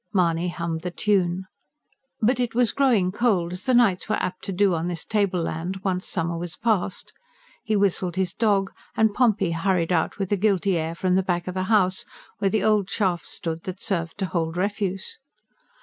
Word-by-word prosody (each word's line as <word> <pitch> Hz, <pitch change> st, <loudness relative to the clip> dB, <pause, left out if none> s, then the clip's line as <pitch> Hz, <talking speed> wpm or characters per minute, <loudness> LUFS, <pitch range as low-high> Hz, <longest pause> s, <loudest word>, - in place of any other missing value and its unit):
Mahony 175 Hz, -2 st, +2 dB
hummed 170 Hz, -2 st, -3 dB
the 180 Hz, -, -3 dB
tune. 185 Hz, -1 st, 0 dB, 0.8 s
But 245 Hz, +3 st, +2 dB
it 240 Hz, -2 st, -1 dB
was 240 Hz, -3 st, +3 dB
growing 235 Hz, -10 st, +2 dB
cold, 190 Hz, -6 st, +1 dB
as 180 Hz, -, -8 dB
the 255 Hz, -, +4 dB
nights 220 Hz, -6 st, +3 dB
were 215 Hz, -, +2 dB
apt 185 Hz, 0 st, -3 dB
to -, -, -2 dB
do 195 Hz, 0 st, +3 dB
on 165 Hz, +1 st, -1 dB
this 175 Hz, -2 st, -4 dB
tableland 185 Hz, -3 st, -1 dB
once 185 Hz, -1 st, -1 dB
summer 170 Hz, -1 st, -2 dB
was 175 Hz, -1 st, -5 dB
past. 210 Hz, -5 st, -1 dB, 0.5 s
He 220 Hz, -, 0 dB
whistled 190 Hz, -3 st, +1 dB
his 185 Hz, -2 st, 0 dB
dog, 200 Hz, -4 st, +1 dB, 0.3 s
and 220 Hz, -1 st, +3 dB
Pompey 210 Hz, -7 st, +2 dB
hurried 170 Hz, 0 st, 0 dB
out 165 Hz, -3 st, +1 dB
with 195 Hz, -1 st, -3 dB
a 205 Hz, -, +3 dB
guilty 195 Hz, -1 st, +2 dB
air 165 Hz, 0 st, -2 dB
from 180 Hz, +1 st, 0 dB
the 190 Hz, -, +4 dB
back 175 Hz, -1 st, -2 dB
of 185 Hz, -, -3 dB
the 185 Hz, 0 st, -1 dB
house, 190 Hz, -3 st, +2 dB, 0.4 s
where 195 Hz, -, +2 dB
the 215 Hz, 0 st, 0 dB
old 210 Hz, -3 st, +2 dB
shaft 185 Hz, -5 st, 0 dB
stood 165 Hz, -1 st, -4 dB
that 185 Hz, 0 st, -5 dB
served 170 Hz, -5 st, -2 dB
to 195 Hz, -, -1 dB
hold 165 Hz, -1 st, -2 dB
refuse. 195 Hz, 0 st, -2 dB
185 Hz, 195 wpm, -24 LUFS, 175-205 Hz, 0.8 s, the